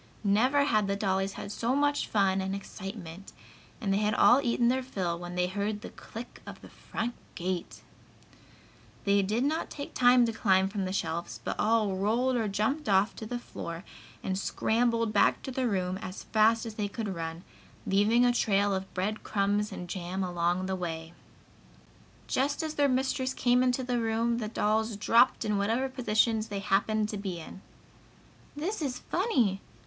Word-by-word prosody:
Never 250 +8 +3
had 215 -8 +2
the 200 - 0
dolls 195 -1 0
had 200 - -7
so 235 +4 0
much 290 0 +1
fun 195 -2 +2
and 190 +1 -2
excitement, 195 -2 -8 0.5
and 200 -6 0
they 200 - +2
had 210 0 +1
all 255 +3 +6
eaten 240 -2 +2
their 260 +2 +2
fill 185 -9 -3
when 175 0 -7
they 180 0 +2
heard 205 +3 -2
the - - -8
click 230 +2 -10
of - - -8
the - - -12
front 235 +2 -4 0.2
gate. 180 0 -4 1.2
They 200 0 +3
did 215 +6 0
not 310 +4 0
take 285 - -7
time 245 -1 +5
to 230 - -2
climb 190 -3 +3
from 200 -1 -2
the 185 - -3
shelves, 170 -3 -3
but - - -3
all 215 -3 +2
rolled 235 +6 +1
or 225 -3 0
jumped 215 +8 -1
off 195 +2 +3
to 220 - -6
the 245 - -3
floor 170 -7 -7 0.4
and 190 0 -1
scrambled 230 +1 +1
back 205 - +3
to 265 - -5
their 255 0 0
room 185 -3 -1
as 185 0 -7
fast 225 +1 +3
as 225 - -5
they 210 -1 -2
could 215 +1 -4
run, 165 0 -5 0.4
leaving 210 +5 +4
a 245 - +4
trail 205 -3 +2
of 190 0 -3
bread 205 +4 -1
crumbs 205 +1 0
and 180 - -6
jam 185 +1 -3
along 175 0 0
the 190 0 -1
way. 165 -2 -5 1.1
Just 285 +4 0
as 310 -1 -3
their 290 -2 +2
mistress 260 0 0
came 245 0 +3
into 255 0 +1
the 245 -1 0
room 230 +1 0
the 215 - -3
dolls 220 +1 0
dropped 230 +4 +4
in 210 -1 +1
whatever 225 +6 +1
positions 225 -3 +1
they 205 -2 -4
happened 210 +2 +1
to 210 - -3
be 190 -4 -4
in. 165 +3 -10 0.9
"This 345 +7 -3
is 270 -4 -2
funny!" 250 - 0
210 Hz, 180 wpm, -29 LUFS, 195-240 Hz, 1.2 s, all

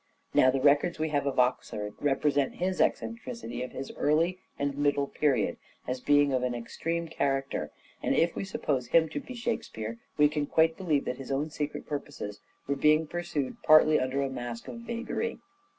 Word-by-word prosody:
Now 130 - +6
the 135 +1 +1
records 145 +5 +3
we 155 0 -1
have 145 -1 0
of 135 - -1
Oxford 115 -4 0
represent 145 -1 +1
his 185 +1 0
eccentricity 230 - -2
in 125 - -3
his 135 - -6
early 165 +5 +2 0.2
and 140 -1 -1
middle 145 0 +2
period 135 -7 +1 0.3
as 130 0 -2
being 145 0 +4
of 130 - +2
an 125 -1 -1
extreme 165 +8 -3
character, 135 -3 -1 0.3
and - - +1
if 170 0 +2
we - - -2
suppose 140 -9 -2
him 160 +4 +4
to 150 - -3
be 255 - -9
Shakespeare, 115 - -3 0.2
we 150 - +6
can 150 -1 -2
quite 160 +1 +3
believe 160 -7 0
that 125 - -3
his 135 - -6
own 145 +3 -1
secret 150 -1 -4
purposes 140 -8 -5 0.3
were 140 - 0
being 155 +3 +4
pursued 165 -4 -3
partly 155 0 +6
under 130 +2 0
a 135 - -1
mask 120 -2 -6
of 235 - -7
vagary. 235 - -3
145 Hz, 180 wpm, -29 LUFS, 130-160 Hz, 0.3 s, Now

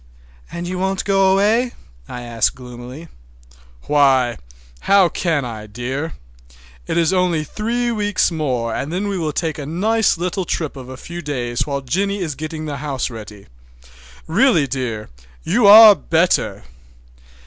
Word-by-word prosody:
"And 175 +1 -5
you 180 0 -4
won't 190 0 -1
go 195 -1 +3
away?" 220 +6 +2 0.3
I 125 - -7
asked 115 -2 0
gloomily. 125 +5 -10 0.8
"Why, 135 -5 +3 0.5
how 195 -3 +6
can 160 -5 -1
I, 110 -3 -7
dear? 130 +9 -4 0.7
It - - -1
is 170 +1 +2
only 180 -4 +1
three 235 +8 -2
weeks 205 -4 0
more 130 -8 -2
and 140 - -4
then 190 +4 -2
we 195 -2 -2
will 155 -2 -1
take 160 0 -3
a 145 - -5
nice 210 +6 +1
little 180 +2 -2
trip 160 -4 -3
of 130 -2 -10
a 130 - -8
few 175 +5 -8
days 125 -6 -3
while 140 -1 -2
Jennie 195 +10 -1
is 160 -4 -2
getting 155 +2 -6
the 145 -2 -4
house 140 -2 -3
ready. 105 -3 -10 0.8
Really, 170 - +3
dear, 120 -5 -4 0.3
you 235 -4 +3
are 215 +1 +11
better!" 170 - 0
160 Hz, 150 wpm, -19 LUFS, 130-190 Hz, 0.8 s, are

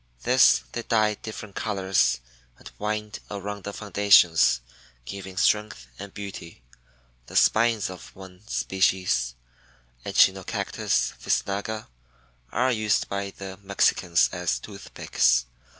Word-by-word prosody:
This - - +5
they 120 - -4
dye 110 -2 +2
different 105 -1 -9
colors 95 - +1 0.4
and - - -13
wind 105 0 -3
around 100 -1 -6
the 100 - -4
foundations, 100 - +4 0.5
giving 95 +3 -8
strength 105 - +1
and 100 0 -8
beauty. 95 -9 -9 0.6
The - - -11
spines 115 -1 +3
of 95 -1 -11
one 95 -1 -13
species 95 - 0 0.7
(Echinocactus - - +1
visnaga) 105 +2 -1 0.7
are 130 +1 +1
used 110 -3 0
by 100 0 -3
the 95 -1 -9
Mexicans 95 -3 +2
as 90 -2 -1
toothpicks. 60 - 0
100 Hz, 105 wpm, -25 LUFS, 90-105 Hz, 0.7 s, This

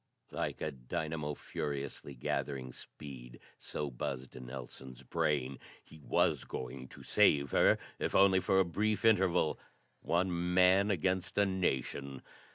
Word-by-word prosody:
Like - - -3
a - - -1
dynamo 75 +4 -4
furiously 70 -1 -5
gathering 65 0 -3
speed, - - -11 0.2
so 75 -2 -4
buzzed 65 +1 -5
Nelson's 65 0 -9
brain. 70 -3 0 0.2
He 80 - -15
was 75 - +1
going 65 +1 -6
to - - -13
save 70 -2 +4
her - - +5 0.2
if - - -1
only 95 -1 +6
for 95 +1 +2
a 95 - +4
brief 105 +4 0
interval! 95 -7 +3 0.4
One 90 0 0
man 95 +2 +5
against 95 0 0
a 100 - +5
nation. 70 -7 -2
75 Hz, 130 wpm, -33 LUFS, 65-95 Hz, 0.4 s, only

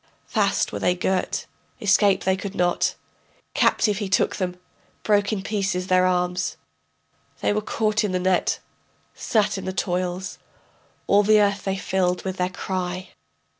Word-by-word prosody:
Fast - - +1
were - - -3
they 180 - +2
girt, 185 +1 -1 0.3
escape 200 -1 +3
they 190 0 +2
could 195 +1 -6
not, 175 0 +1 0.6
Captive 210 -2 +2
he 205 -3 -3
took 200 - +2
them, 180 -1 -3 0.4
broke 205 -1 +2
in 200 -3 -2
pieces 195 -3 -1
their 185 0 +3
arms. 180 0 0 0.8
They - - +2
were 215 - 0
caught 215 0 0
in 205 - 0
the 185 - +1
net, 185 0 +1 0.6
sat 210 -3 0
in - - -7
the 190 - -3
toils, 180 0 -2 0.7
All 200 +1 +5
the 215 +1 +5
earth 200 -1 +1
they 195 0 -1
filled 180 -2 0
with 190 0 -3
their 180 0 0
cry. 185 0 -4
190 Hz, 155 wpm, -24 LUFS, 180-205 Hz, 0.8 s, All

